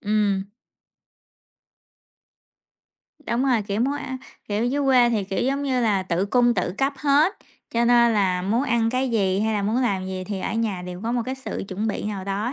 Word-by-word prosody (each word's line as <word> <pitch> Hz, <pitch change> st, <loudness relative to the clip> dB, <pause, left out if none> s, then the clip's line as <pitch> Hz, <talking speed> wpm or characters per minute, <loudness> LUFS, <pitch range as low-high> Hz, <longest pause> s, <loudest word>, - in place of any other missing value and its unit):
Ừm. 205 Hz, -2 st, 0 dB, 2.7 s
Đúng 255 Hz, -3 st, -1 dB
rồi, 245 Hz, -5 st, +2 dB
kiểu, 200 Hz, +2 st, -3 dB
muốn 275 Hz, +4 st, +1 dB
ăn 260 Hz, -2 st, -5 dB, 0.3 s
kiểu, 210 Hz, +2 st, 0 dB
dưới 285 Hz, +3 st, 0 dB
quê 250 Hz, -3 st, +5 dB
thì, 210 Hz, -4 st, 0 dB
kiểu 195 Hz, 0 st, -2 dB
giống 275 Hz, +3 st, 0 dB
như 260 Hz, -3 st, 0 dB
là, 205 Hz, -5 st, +2 dB
tự 185 Hz, +1 st, -1 dB
cung 240 Hz, +2 st, +3 dB
tự 180 Hz, -, -1 dB
cấp 275 Hz, +1 st, +1 dB
hết, 295 Hz, +6 st, +3 dB, 0.3 s
cho 235 Hz, 0 st, +1 dB
nên 235 Hz, -1 st, +5 dB
là 185 Hz, -3 st, +1 dB
muốn 225 Hz, +7 st, +1 dB
ăn 230 Hz, -4 st, +1 dB
cái 255 Hz, +1 st, 0 dB
gì 195 Hz, -3 st, +1 dB
hay 220 Hz, 0 st, 0 dB
là, 205 Hz, -, 0 dB
muốn 215 Hz, +4 st, 0 dB
làm 190 Hz, -5 st, 0 dB
gì 185 Hz, -1 st, -4 dB
thì, 200 Hz, -1 st, -4 dB
ở -, -, -3 dB
nhà 210 Hz, -6 st, -1 dB
đều 180 Hz, 0 st, -7 dB
có 230 Hz, +1 st, -2 dB
một 240 Hz, -1 st, 0 dB
cái 260 Hz, -, -3 dB
sự 265 Hz, -, -6 dB
chuẩn 205 Hz, +3 st, -3 dB
bị 210 Hz, -, -2 dB
nào 200 Hz, -3 st, -4 dB
đó. 205 Hz, +5 st, -2 dB
225 Hz, 205 wpm, -23 LUFS, 195-250 Hz, 2.7 s, quê